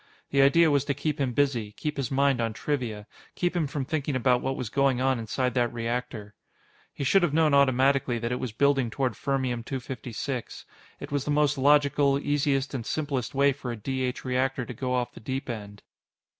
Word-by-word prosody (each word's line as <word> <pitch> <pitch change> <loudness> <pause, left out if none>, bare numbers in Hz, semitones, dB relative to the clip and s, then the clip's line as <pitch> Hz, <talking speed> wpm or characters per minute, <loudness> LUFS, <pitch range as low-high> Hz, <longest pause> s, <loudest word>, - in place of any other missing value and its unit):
The 140 - +4
idea 160 +4 +5
was 140 -2 +3
to 140 - -1
keep 150 +1 -2
him 130 -2 +1
busy, 120 -6 0
keep 150 +4 -4
his 135 -4 -2
mind 135 -2 +2
on 115 -1 -1
trivia, 115 -6 -3 0.3
keep 175 0 -1
him 165 -4 +1
from 135 -1 -3
thinking 145 -1 -2
about 125 -1 +2
what 135 0 -2
was 120 -5 -5
going 135 -1 +2
on 130 -1 +1
inside 125 +3 -1
that 120 -1 +1
reactor. 120 -2 -4 0.6
He - - -5
should 190 +9 +4
have 160 -4 +1
known 160 -2 +3
automatically 135 -2 +3
that 115 +1 -3
it 125 - -1
was 125 - -3
building 135 +1 +2
toward 130 0 -1
Fermium 130 0 -2
256. 125 0 -5 0.3
It - - -8
was 145 -2 0
the - - -4
most 150 -1 +2
logical, 140 0 +3
easiest, 140 -1 0
and 130 -4 -3
simplest 140 -3 -3
way 140 +1 +4
for 130 -2 -6
a 120 - -5
D 130 +5 -3
H 125 0 -3
reactor 130 0 0
to 125 - -7
go 125 +2 -2
off 125 -1 -2
the - - -11
deep 135 +4 -4
end. 105 -4 -7
135 Hz, 205 wpm, -27 LUFS, 120-140 Hz, 0.6 s, idea